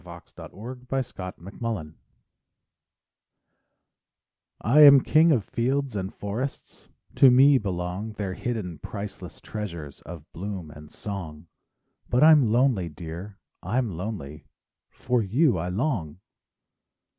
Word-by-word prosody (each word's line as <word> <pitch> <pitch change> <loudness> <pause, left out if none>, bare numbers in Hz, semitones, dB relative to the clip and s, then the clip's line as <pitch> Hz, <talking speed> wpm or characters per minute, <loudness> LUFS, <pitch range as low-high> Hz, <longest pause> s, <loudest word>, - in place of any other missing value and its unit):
SONGS 85 -1 -13
AND - - -10 0.4
DREAMS 135 -2 -2
To 90 -1 -6
My 90 +4 -11 0.2
Love 80 -9 -5 2.7
I 125 +8 +3
am 140 -2 +10
king 160 +5 +4
of 125 -8 +2
fields 135 +1 -1
and 95 -1 -3
forests; 115 +7 -6 0.2
To 135 - +7
me 135 +2 +6
belong 95 +2 -4
Their 100 -3 -4
hidden 95 -9 -4
priceless 100 +6 -8
treasures 85 -10 -7
Of 80 -2 -10
bloom 95 -3 -6
and 75 0 -13
song. 85 -7 -7 0.6
But 125 +4 +3
I'm 150 -8 +6
lonely, 120 -7 +2
dear, 85 +6 -8 0.2
I'm 120 -2 -1
lonely,— 80 -5 -6 0.4
For 125 -1 -1
you 115 - +2
I 90 +2 -3
long! 90 - -2
100 Hz, 120 wpm, -25 LUFS, 85-125 Hz, 2.7 s, am